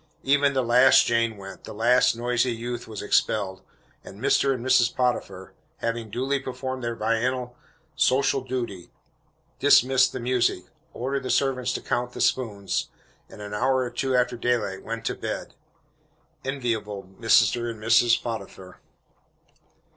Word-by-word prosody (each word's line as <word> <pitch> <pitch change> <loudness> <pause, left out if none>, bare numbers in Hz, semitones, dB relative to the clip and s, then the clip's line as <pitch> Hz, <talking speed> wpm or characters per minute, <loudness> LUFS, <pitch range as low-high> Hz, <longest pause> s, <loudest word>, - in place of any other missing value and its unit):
Even 140 +1 +3
the 130 -1 +1
last 125 +2 +6
Jane 115 -2 0
went 95 0 -10
the - - -9
last 120 +2 +3
noisy 120 +1 0
youth 120 +1 -5
was 110 -2 -7
expelled 95 -3 0 0.4
and - - -12
Mr. 140 - +2
and 125 -2 -3
Mrs. 125 -2 +3
Potiphar, 125 -1 -2 0.2
having 115 -1 -3
duly 130 +5 -1
performed 130 -1 -5
their 115 0 -2
biennial 125 +3 -1 0.4
social 135 +1 +2
duty, 120 -9 -5 0.7
dismissed 130 -2 +5
the 130 - -5
music, 120 -6 0 0.3
ordered 135 +3 -3
the 130 - -6
servants 130 -2 +1
to - - -4
count 125 0 -2
the - - -8
spoons, 105 -6 -1 0.4
and 105 - -11
an 105 0 -7
hour 130 +6 +1
or 125 - -5
two 135 -2 -1
after 125 0 +1
daylight 115 -5 -1
went 115 0 -6
to - - 0
bed. - - -5 0.9
Enviable 115 -7 -3
Mr. 115 +4 +2
and 115 -2 -7
Mrs. 115 +1 +4
Potiphar! 100 -5 -7
120 Hz, 145 wpm, -25 LUFS, 115-130 Hz, 0.9 s, last